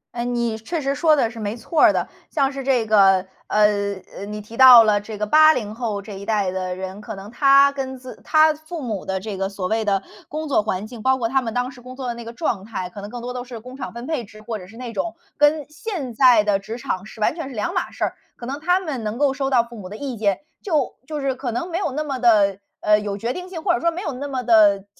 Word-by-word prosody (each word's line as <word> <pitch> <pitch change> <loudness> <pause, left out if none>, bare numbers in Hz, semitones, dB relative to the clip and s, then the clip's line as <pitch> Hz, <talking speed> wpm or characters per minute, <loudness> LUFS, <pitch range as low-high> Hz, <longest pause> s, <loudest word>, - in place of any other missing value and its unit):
哎， 235 - -2
你 235 -2 -1
确 320 +10 -4
实 275 0 -1
说 315 -1 +4
的 235 -6 +2
是 230 - -12
没 210 +3 -3
错 310 +6 -1
儿 - - +8
的。 - - -1 0.2
像 275 -3 +1
是 275 -1 -6
这 250 -4 +2
个， 195 -3 +5 0.2
呃 205 -1 +2 0.2
呃， 200 - -6
你 210 +1 -6
提 220 +2 -11
到 250 -3 +10
了 205 -1 +3
这 210 0 -8
个 210 0 -2
80 280 -7 +5
后 220 -4 -3
这 200 +1 -9
一 195 +1 -8
代 205 -4 +1
的 185 -1 -3
人， 190 +2 -6
可 215 -1 -7
能 195 +2 -9
他 275 +3 +6
跟 265 -1 -4
自 255 0 -10
他 310 0 +5
父 315 +1 -8
母 215 -7 -4
的 190 0 -2
这 205 0 -5
个 195 +1 -2
所 195 -2 -4
谓 220 +1 0
的 195 -2 +1 0.3
工 310 +1 -4
作 260 -7 +2
环 205 0 -3
境， 230 -2 -10
包 260 +2 +3
括 230 -3 -1
他 265 +2 +1
们 230 -3 -4
当 250 +1 -1
时 250 -2 -13
工 255 +1 -11
作 260 -2 -4
的 240 - -1
那 235 0 -8
个 230 - -7
状 235 - -2
态， 190 -4 -5
可 200 +2 -9
能 205 - -7
更 245 0 -7
多 250 +1 -5
都 250 -1 -4
是 245 -3 -9
工 255 +3 -11
厂 265 - -6
分 235 +2 -8
配 305 -7 -2
制， 215 +1 -14
或 220 0 -4
者 180 -2 -11
是 225 +4 -14
那 245 -2 -6
种 335 - -3 0.2
跟 295 0 +3
现 305 - -5
在 235 -3 +5
的 200 -1 +2
职 220 +4 -7
场 190 -4 -3
是 220 - -13
完 215 +8 +1
全 325 -5 -5
是 - - -9
两 210 -3 -2
码 - - -2
事 - - -1
儿。 - - -4 0.2
可 240 - -8
能 280 +3 -5
他 360 +3 +3
们 300 -10 -4
能 215 +2 -3
够 280 -1 +2
收 270 -1 -2
到 240 -3 +3
父 235 - -12
母 190 -4 -8
的 210 - -8
意 270 -2 -4
见， 200 -3 0 0.2
就 310 - 0
就 305 -1 -4
是 275 -2 -1
可 255 -2 -4
能 340 +10 -3
没 345 - -2
有 365 -7 -1
那 300 +3 -3
么 270 -3 -3
地， 205 -5 +4 0.2
呃， 210 0 +4
有 205 -1 -3
决 235 +4 -2
定 360 0 -7
性， 330 -4 -6
或 350 - +3
者 - - -1
说 335 - +2
没 350 +3 -5
有 300 -7 -3
那 280 +3 -5
么 255 -2 -3
地 205 -4 +5
235 Hz, 300 characters per minute, -22 LUFS, 210-275 Hz, 0.3 s, 到